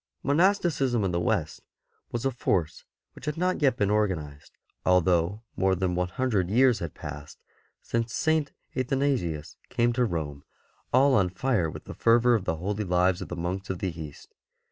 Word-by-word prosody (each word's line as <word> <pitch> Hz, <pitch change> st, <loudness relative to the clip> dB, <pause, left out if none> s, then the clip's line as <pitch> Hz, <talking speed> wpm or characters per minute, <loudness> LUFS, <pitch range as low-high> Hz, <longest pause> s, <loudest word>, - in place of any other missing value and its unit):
Monasticism 145 Hz, -, +2 dB
in 95 Hz, -, 0 dB
the 85 Hz, -, 0 dB
West 85 Hz, -, -1 dB, 0.5 s
was 120 Hz, +2 st, -3 dB
a 135 Hz, -, +2 dB
force 90 Hz, -9 st, -1 dB, 0.3 s
which -, -, -12 dB
had 150 Hz, +1 st, -2 dB
not 180 Hz, 0 st, 0 dB
yet 130 Hz, -4 st, +3 dB
been 100 Hz, 0 st, +1 dB
organized, 85 Hz, -9 st, -2 dB, 0.3 s
although 90 Hz, +3 st, +2 dB
more 95 Hz, -1 st, +2 dB
than 90 Hz, 0 st, -1 dB
one 90 Hz, +1 st, 0 dB
hundred 100 Hz, -2 st, 0 dB
years 125 Hz, +2 st, +4 dB
had 85 Hz, -, -5 dB
passed 75 Hz, -2 st, -8 dB, 0.5 s
since 115 Hz, 0 st, -2 dB
St. 160 Hz, +2 st, +1 dB, 0.2 s
Athanasius 130 Hz, -, -1 dB
came 120 Hz, -1 st, +1 dB
to 125 Hz, +1 st, +1 dB
Rome 75 Hz, -9 st, -3 dB, 0.5 s
all 135 Hz, +2 st, +5 dB
on 95 Hz, -6 st, +3 dB
fire 95 Hz, -2 st, 0 dB
with -, -, -9 dB
the -, -, -8 dB
fervour 120 Hz, +1 st, +4 dB
of 105 Hz, -5 st, +1 dB
the 80 Hz, -, 0 dB
holy 100 Hz, +6 st, -2 dB
lives 90 Hz, -1 st, +2 dB
of -, -, -5 dB
the 85 Hz, -, -5 dB
monks 90 Hz, +3 st, -4 dB
of 95 Hz, -, -2 dB
the 95 Hz, +1 st, -2 dB
East. 75 Hz, -3 st, -10 dB
100 Hz, 175 wpm, -27 LUFS, 85-125 Hz, 0.5 s, all